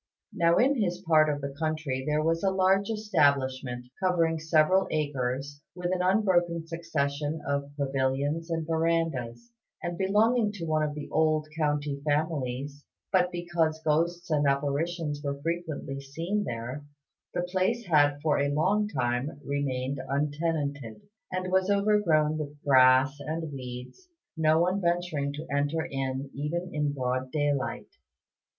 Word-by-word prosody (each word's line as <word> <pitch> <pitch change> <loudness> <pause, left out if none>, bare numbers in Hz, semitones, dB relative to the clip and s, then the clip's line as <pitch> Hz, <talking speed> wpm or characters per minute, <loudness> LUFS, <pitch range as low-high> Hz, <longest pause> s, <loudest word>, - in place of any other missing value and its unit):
Now 170 0 +3
in 265 0 +3
his 175 -3 0
part 155 -4 +4
of 145 -1 -2
the 140 0 -4
country 155 -5 -2
there 150 0 +1
was 165 +1 +1
a 195 - +4
large 190 +1 +2
establishment, 135 - +1 0.2
covering 165 -3 +2
several 160 +4 +3
acres, 145 -1 -2
with 180 0 -2
an 180 - 0
unbroken 180 -4 +2
succession 155 -2 -2
of 140 0 -1
pavilions 140 +4 -1
and 165 -1 -1
verandahs, 165 - -1 0.3
and 175 0 -4
belonging 210 +3 +3
to 180 -5 -5
one 155 -1 +1
of 150 -1 -1
the 150 - -6
old 155 -1 +2
county 145 -2 -1
families; 145 -2 -2 0.3
but 180 -2 +3
because 170 -2 0
ghosts 170 +3 0
and 145 -2 +3
apparitions 145 +2 -1
were 140 -1 -3
frequently 160 -3 -3
seen 170 +9 -2
there, 120 +5 -5 0.5
the 175 - 0
place 190 +6 0
had 145 -4 +3
for 150 -3 +2
a 140 0 +1
long 190 +9 +2
time 130 - -2
remained 140 -1 -2
untenanted, 145 -5 -2 0.3
and 185 0 -2
was 190 +1 +2
overgrown 200 -7 +3
with 145 -1 -6
grass 130 +1 +5
and 160 +2 -4
weeds, 125 - -8 0.3
no 160 0 +3
one 185 +3 +1
venturing 170 -5 0
to 150 +2 -6
enter 145 +3 0
in 135 0 -3
even 170 +6 -3
in 150 -1 0
broad 130 -1 -2
daylight. 145 -5 -1
155 Hz, 140 wpm, -28 LUFS, 140-175 Hz, 0.5 s, grass